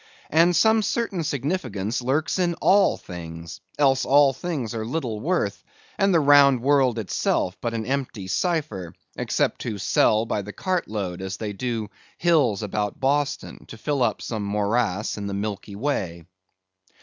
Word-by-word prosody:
And 170 Hz, +2 st, +4 dB
some 220 Hz, +5 st, +4 dB
certain 205 Hz, -5 st, -1 dB
significance 130 Hz, -, -2 dB
lurks 145 Hz, +9 st, 0 dB
in 175 Hz, -2 st, +1 dB
all 195 Hz, +3 st, +4 dB
things, 85 Hz, -2 st, -9 dB, 0.2 s
else 135 Hz, -2 st, +3 dB
all 140 Hz, +1 st, +5 dB
things 140 Hz, -9 st, -4 dB
are 110 Hz, -1 st, -3 dB
little 120 Hz, -3 st, -3 dB
worth, 135 Hz, -, -1 dB, 0.3 s
and 195 Hz, -1 st, +2 dB
the 170 Hz, -, +5 dB
round 140 Hz, -4 st, +6 dB
world 135 Hz, -4 st, +3 dB
itself 95 Hz, -3 st, -1 dB
but 115 Hz, -1 st, -2 dB
an 110 Hz, -1 st, -3 dB
empty 130 Hz, -7 st, -3 dB
cipher, 95 Hz, -, -2 dB, 0.2 s
except -, -, -1 dB
to 110 Hz, -4 st, -3 dB
sell 110 Hz, +2 st, +2 dB
by 105 Hz, -, -1 dB
the 105 Hz, +1 st, -8 dB
cartload, 105 Hz, -, -2 dB
as 95 Hz, +1 st, -4 dB
they 105 Hz, -2 st, -4 dB
do 115 Hz, -1 st, -3 dB, 0.3 s
hills 145 Hz, -, +2 dB
about 105 Hz, 0 st, -2 dB
Boston, 140 Hz, +1 st, -1 dB
to 115 Hz, -, -10 dB
fill 140 Hz, +4 st, -1 dB
up 115 Hz, -3 st, 0 dB
some 110 Hz, -3 st, -3 dB
morass 105 Hz, 0 st, 0 dB
in 100 Hz, -, -4 dB
the 100 Hz, -, -3 dB
Milky 100 Hz, 0 st, -4 dB
Way. 95 Hz, -, -2 dB
120 Hz, 155 wpm, -24 LUFS, 105-145 Hz, 0.3 s, round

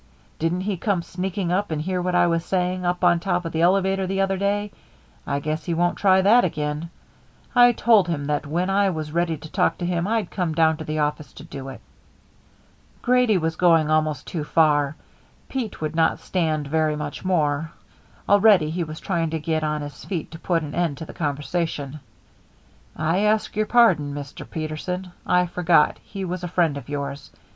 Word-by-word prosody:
Didn't 165 Hz, +3 st, 0 dB
he 195 Hz, 0 st, -2 dB
come 185 Hz, -1 st, 0 dB
sneaking 180 Hz, 0 st, -3 dB
up 195 Hz, +3 st, 0 dB
and 155 Hz, -2 st, -2 dB
hear 180 Hz, +3 st, -2 dB
what 180 Hz, 0 st, -1 dB
I 175 Hz, 0 st, +5 dB
was 165 Hz, -1 st, +1 dB
saying 180 Hz, 0 st, -1 dB
up 180 Hz, +1 st, -1 dB
on 175 Hz, -1 st, +5 dB
top 180 Hz, -1 st, -1 dB
of 165 Hz, -, -3 dB
the 160 Hz, -, -1 dB
elevator 190 Hz, +2 st, +2 dB
the 195 Hz, +1 st, -2 dB
other 195 Hz, 0 st, +1 dB
day? 205 Hz, +1 st, -1 dB, 0.6 s
I 140 Hz, 0 st, 0 dB
guess 155 Hz, +2 st, -3 dB
he 170 Hz, -, -1 dB
won't 175 Hz, +1 st, 0 dB
try 190 Hz, -1 st, +4 dB
that 230 Hz, +5 st, +6 dB
again. 155 Hz, -1 st, -2 dB, 0.6 s
I 245 Hz, -1 st, +7 dB
told 220 Hz, -6 st, +4 dB
him 150 Hz, -4 st, -2 dB
that 145 Hz, 0 st, -1 dB
when 175 Hz, +5 st, -1 dB
I 200 Hz, 0 st, +3 dB
was 155 Hz, -4 st, -4 dB
ready 170 Hz, 0 st, 0 dB
to 155 Hz, +1 st, -12 dB
talk -, -, +1 dB
to 175 Hz, -, -4 dB
him, 175 Hz, 0 st, -1 dB
I'd 225 Hz, 0 st, -1 dB
come 175 Hz, -5 st, -2 dB
down 160 Hz, -1 st, +3 dB
to 160 Hz, -, -6 dB
the 155 Hz, 0 st, -3 dB
office 150 Hz, -2 st, -2 dB
to 140 Hz, -, -11 dB
do 135 Hz, -4 st, -8 dB
it." 135 Hz, -, -10 dB, 1.2 s
Grady 250 Hz, -4 st, +3 dB
was 160 Hz, -1 st, -1 dB
going 165 Hz, -3 st, +3 dB
almost 155 Hz, -2 st, +1 dB
too 160 Hz, -4 st, -4 dB
far; 150 Hz, -2 st, +2 dB, 0.5 s
Pete 245 Hz, -10 st, -4 dB
would 155 Hz, 0 st, -3 dB
not 165 Hz, 0 st, +2 dB
stand 160 Hz, -5 st, -1 dB
very 155 Hz, +1 st, +1 dB
much 150 Hz, -1 st, -6 dB
more; 160 Hz, -4 st, 0 dB, 0.6 s
already 200 Hz, -6 st, +5 dB
he 175 Hz, +1 st, -1 dB
was 155 Hz, -1 st, -7 dB
trying 170 Hz, -4 st, -1 dB
to 160 Hz, 0 st, -2 dB
get 155 Hz, 0 st, -1 dB
on 150 Hz, -1 st, -1 dB
his 145 Hz, -3 st, -9 dB
feet 175 Hz, -6 st, -4 dB
to 165 Hz, -, -9 dB
put 165 Hz, -2 st, 0 dB
an 145 Hz, -, -6 dB
end 170 Hz, -5 st, -1 dB
to 160 Hz, -, -7 dB
the -, -, -10 dB
conversation. 150 Hz, -1 st, -3 dB, 1.0 s
"I 160 Hz, +4 st, 0 dB
ask 210 Hz, +1 st, +1 dB
your 215 Hz, 0 st, 0 dB
pardon, 170 Hz, -13 st, +4 dB
Mr. 145 Hz, -1 st, -8 dB
Peterson. 170 Hz, +4 st, -4 dB, 0.2 s
I 180 Hz, 0 st, +3 dB
forgot 170 Hz, -3 st, +2 dB
he 195 Hz, -2 st, -6 dB
was 180 Hz, 0 st, -4 dB
a -, -, -2 dB
friend 170 Hz, -4 st, +1 dB
of 140 Hz, -1 st, -8 dB
yours. 140 Hz, -1 st, -5 dB
170 Hz, 200 wpm, -23 LUFS, 155-185 Hz, 1.2 s, I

